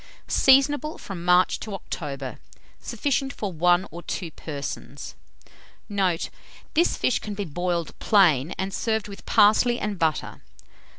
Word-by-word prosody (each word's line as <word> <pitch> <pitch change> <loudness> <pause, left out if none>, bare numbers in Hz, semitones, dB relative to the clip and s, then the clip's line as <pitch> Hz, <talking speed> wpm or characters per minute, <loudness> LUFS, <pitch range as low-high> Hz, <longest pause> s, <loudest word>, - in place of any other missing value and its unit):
Seasonable 290 +3 +4
from 185 -4 -7
March 180 +1 +4
to 210 -3 -5
October. 140 -7 -6 0.4
Sufficient 275 -1 -1
for 205 -7 -5
1 175 +3 +3
or 170 +2 -8
2 170 -1 -5
persons. 140 - -7 0.7
Note. 190 -5 0 0.4
This 340 +3 +2
fish 250 - +1
can 210 -1 -6
be 200 0 -3
boiled 175 +1 -2
plain, 170 -8 +4
and 190 +1 -3
served 220 0 -1
with 200 -1 -11
parsley 240 +4 +5
and 210 -3 -3
butter. 160 -2 -1
190 Hz, 130 wpm, -25 LUFS, 165-215 Hz, 0.7 s, parsley